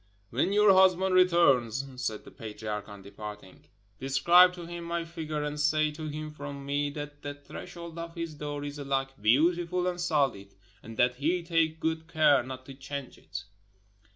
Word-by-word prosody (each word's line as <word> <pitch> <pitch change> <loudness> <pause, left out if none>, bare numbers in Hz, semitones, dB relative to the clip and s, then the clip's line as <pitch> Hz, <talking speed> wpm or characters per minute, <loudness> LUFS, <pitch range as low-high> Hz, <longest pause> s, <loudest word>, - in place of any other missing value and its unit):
"When 140 +11 +1
your 205 -1 +6
husband 190 0 +5
returns," 140 -9 +4 0.2
said 110 -3 -3
the - - -12
patriarch 105 -1 -6
on 100 -1 -11
departing, 105 -1 -10 0.3
"describe 170 +7 +6
to 175 -1 -8
him 170 0 -7
my 170 0 -2
figure 155 -3 -4
and 150 0 -3
say 155 +1 +2
to 155 +1 -6
him 155 +1 -5
from 140 -1 -7
me 145 +1 0
that 145 0 -7
the 145 0 -5
threshold 170 +3 -9
of 165 0 -7
his 165 -2 -4
door 145 -1 -5
is 145 0 -6
alike 135 -1 -1
beautiful 170 - +3
and 180 -1 -1
solid, 135 - 0 0.3
and 115 0 -10
that 125 0 +3
he 170 +6 0
take 165 -1 +1
good 160 0 -2
care 155 -4 +4
not 130 +1 -8
to 135 - -9
change 140 0 -7
it." 100 +1 -7
150 Hz, 175 wpm, -29 LUFS, 135-170 Hz, 0.3 s, your